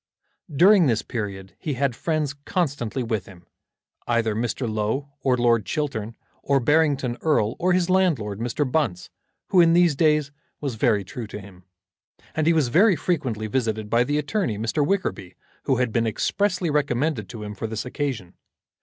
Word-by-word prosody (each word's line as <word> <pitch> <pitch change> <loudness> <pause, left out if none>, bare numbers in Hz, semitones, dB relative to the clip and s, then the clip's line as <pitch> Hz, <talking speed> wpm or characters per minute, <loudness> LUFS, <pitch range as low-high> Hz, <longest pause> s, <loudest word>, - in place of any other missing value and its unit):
During 180 +3 +6
this 115 -3 +1
period 100 -4 -5
he 150 -4 -3
had 130 -2 0
friends 155 -1 -1
constantly 140 - -2
with 110 -5 -2
him, 90 -3 -15 0.6
either 115 -2 +1
Mr. 120 +3 -2
Low, 110 +6 -2
or 130 -2 +2
Lord 120 -2 +3
Chiltern, 115 -6 -3 0.3
or 140 -1 +2
Barrington 140 -2 +2
Erle, 120 -8 +1
or 180 +1 +2
his 180 -1 +2
landlord, 160 - +1
Mr. 120 +5 -1
Bunce, 125 - -1 0.4
who, 180 - +5
in 165 -1 +5
these 170 -3 +4
days, 150 -1 +2 0.3
was 140 -4 -3
very 110 -3 +1
true 110 +4 -7
to 105 - -7
him. 95 -2 -14 0.7
And 155 0 0
he 170 - +5
was 155 -6 +2
very 185 - +5
frequently 130 - -2
visited 110 -2 -2
by 115 +1 +4
the 145 +4 -1
attorney, 150 - -1
Mr. 115 +8 0
Wickerby, 140 - -2 0.3
who 135 - +2
had 125 -2 0
been 115 -1 +1
expressly 180 - 0
recommended 145 -5 0
to 110 -3 -7
him 105 0 -6
for 105 +3 -5
this 110 +1 -4
occasion. 125 -9 -4
130 Hz, 170 wpm, -24 LUFS, 110-155 Hz, 0.7 s, During